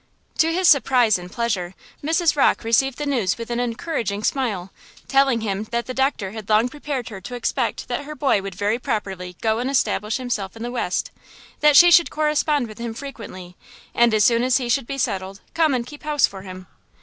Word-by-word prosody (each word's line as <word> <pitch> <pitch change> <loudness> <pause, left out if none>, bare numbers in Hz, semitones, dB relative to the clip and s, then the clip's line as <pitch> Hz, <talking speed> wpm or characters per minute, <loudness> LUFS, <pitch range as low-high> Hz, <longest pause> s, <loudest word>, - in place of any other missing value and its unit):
To 325 0 +4
his 365 +2 +2
surprise 250 - +4
and 180 0 -10
pleasure, 200 -6 -2 0.3
Mrs. 325 +1 +2
Rocke 280 - +3
received 240 +3 +2
the 295 - -3
news 240 -10 0
with 230 0 -7
an 235 - -1
encouraging 230 - -3
smile, 210 -10 -1 0.4
telling 270 -4 +3
him 205 -1 -2
that 235 +2 -3
the 255 - -5
doctor 265 -7 0
had 220 -1 -9
long 215 +3 +3
prepared 285 -3 -5
her 195 -4 -9
to 245 +7 -7
expect 240 - -2
that 285 - -3
her 305 +1 -7
boy 275 -9 +1
would 195 -1 -7
very 205 +4 0
properly 195 -8 -4
go 220 0 +1
and 250 +2 -1
establish 220 -5 0
himself 225 -6 -4
in 225 - -7
the 240 - -4
West; 230 -7 -2 0.5
that 300 -1 +5
she 350 0 +8
should 340 0 +6
correspond 300 -3 +1
with 215 0 -12
him 235 -1 -5
frequently, 205 -10 -9 0.4
and 235 0 +4
as 210 - +4
soon 235 -2 +4
as 255 0 +3
he 250 -3 -3
should 240 0 +1
be 275 - -4
settled, 195 -5 -2
come 315 -4 +2
and 240 -1 -2
keep 295 +3 -11
house 300 -2 +2
for 195 -1 -8
him. 185 -1 -10
235 Hz, 210 wpm, -22 LUFS, 205-275 Hz, 0.5 s, she